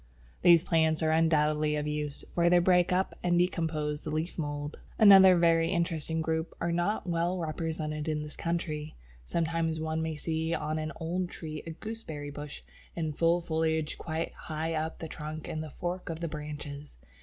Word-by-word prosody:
These 170 Hz, -2 st, +7 dB
plants 160 Hz, -2 st, +2 dB
are 155 Hz, -, +3 dB
undoubtedly 155 Hz, -1 st, +3 dB
of 150 Hz, 0 st, -1 dB
use, 150 Hz, -1 st, -3 dB
for 170 Hz, 0 st, +3 dB
they 180 Hz, -, +6 dB
break 180 Hz, 0 st, +4 dB
up 185 Hz, +1 st, +1 dB
and 175 Hz, -1 st, +2 dB
decompose 160 Hz, -4 st, 0 dB
the -, -, -4 dB
leaf 155 Hz, +3 st, -2 dB
mould. 145 Hz, -1 st, -4 dB, 0.2 s
Another 190 Hz, -3 st, +9 dB
very 165 Hz, -1 st, +4 dB
interesting 165 Hz, -3 st, -1 dB
group 160 Hz, +1 st, -2 dB
are 170 Hz, -, 0 dB
not 175 Hz, +5 st, 0 dB
well 170 Hz, +1 st, 0 dB
represented 155 Hz, -2 st, -3 dB
in 150 Hz, -1 st, -1 dB
this 150 Hz, 0 st, -6 dB
country. 155 Hz, -3 st, -3 dB, 0.3 s
Sometimes 165 Hz, -, 0 dB
one 160 Hz, 0 st, -1 dB
may 160 Hz, -1 st, -2 dB
see 160 Hz, +2 st, -1 dB
on 155 Hz, +1 st, -2 dB
an 155 Hz, 0 st, -3 dB
old 175 Hz, +2 st, -2 dB
tree 155 Hz, -3 st, -6 dB
a -, -, -3 dB
Gooseberry 160 Hz, -6 st, -6 dB
bush 145 Hz, 0 st, -8 dB, 0.3 s
in 160 Hz, -2 st, -2 dB
full 170 Hz, +3 st, +2 dB
foliage 160 Hz, -1 st, -1 dB
quite 160 Hz, 0 st, -3 dB
high 160 Hz, +1 st, -4 dB
up 160 Hz, 0 st, -2 dB
the 165 Hz, -, -6 dB
trunk 155 Hz, 0 st, -6 dB
in 155 Hz, -, -3 dB
the 155 Hz, -, -6 dB
fork 175 Hz, +5 st, -4 dB
of 165 Hz, -1 st, -4 dB
the 170 Hz, -, -2 dB
branches. 150 Hz, -, -7 dB
160 Hz, 180 wpm, -30 LUFS, 155-170 Hz, 0.3 s, Another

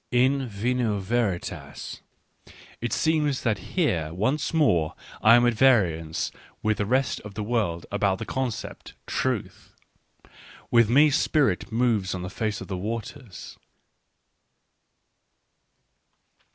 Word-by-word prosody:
In 130 Hz, +2 st, +2 dB
vino 115 Hz, +1 st, -1 dB
Veritas: 100 Hz, -2 st, -3 dB, 0.8 s
it 120 Hz, -, -2 dB
seems 150 Hz, -4 st, +1 dB
that 110 Hz, -4 st, +1 dB, 0.2 s
here 85 Hz, -, +1 dB
once 130 Hz, -, -1 dB
more 90 Hz, -, +2 dB, 0.3 s
I 110 Hz, +2 st, +7 dB
am 120 Hz, 0 st, +5 dB
at 120 Hz, -, +3 dB
variance 90 Hz, -11 st, +2 dB, 0.3 s
with 110 Hz, 0 st, +1 dB
the 105 Hz, -, 0 dB
rest 130 Hz, +3 st, +1 dB
of 105 Hz, -1 st, -11 dB
the 105 Hz, -, -3 dB
world 105 Hz, -7 st, -1 dB
about 100 Hz, -1 st, +1 dB
the -, -, -6 dB
concept 130 Hz, -4 st, -4 dB
" -, -, -45 dB
Truth -, -, -3 dB, 0.3 s
" -, -, -29 dB
— -, -, -20 dB
with 115 Hz, -2 st, +5 dB
me 145 Hz, +5 st, +5 dB
spirit 145 Hz, -3 st, +1 dB
moves 110 Hz, -5 st, +1 dB
on 90 Hz, -, -5 dB
the 90 Hz, -, -6 dB
face 110 Hz, 0 st, -3 dB
of -, -, -7 dB
the 95 Hz, -, -4 dB
waters. 110 Hz, +2 st, -7 dB
115 Hz, 130 wpm, -25 LUFS, 100-130 Hz, 0.8 s, I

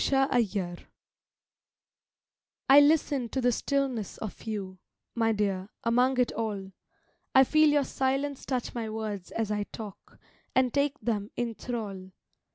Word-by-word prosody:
LISTENING 215 Hz, -10 st, +1 dB, 1.9 s
I 275 Hz, +1 st, +9 dB
LISTEN 285 Hz, -4 st, +3 dB
to 265 Hz, -, -2 dB
the 245 Hz, -1 st, +3 dB
stillness 260 Hz, -4 st, -1 dB
of 215 Hz, -, -7 dB
you, 195 Hz, -4 st, -5 dB, 0.3 s
My 225 Hz, -1 st, +2 dB
dear, 200 Hz, -2 st, -1 dB
among 250 Hz, +2 st, +3 dB
it 250 Hz, -, +3 dB
all; 205 Hz, -4 st, -3 dB, 0.6 s
I 265 Hz, -, +9 dB
feel 310 Hz, +3 st, +4 dB
your 290 Hz, -1 st, +3 dB
silence 270 Hz, +1 st, -1 dB
touch 255 Hz, -3 st, -2 dB
my 230 Hz, -2 st, -3 dB
words 215 Hz, -4 st, -4 dB
as 220 Hz, -2 st, -2 dB
I 205 Hz, -1 st, -1 dB
talk, 210 Hz, -2 st, -10 dB, 0.4 s
And 255 Hz, -2 st, +3 dB
take 285 Hz, 0 st, +1 dB
them 210 Hz, -3 st, -1 dB
in 240 Hz, -1 st, -2 dB
thrall. 200 Hz, -6 st, -6 dB
230 Hz, 135 wpm, -28 LUFS, 205-265 Hz, 1.9 s, I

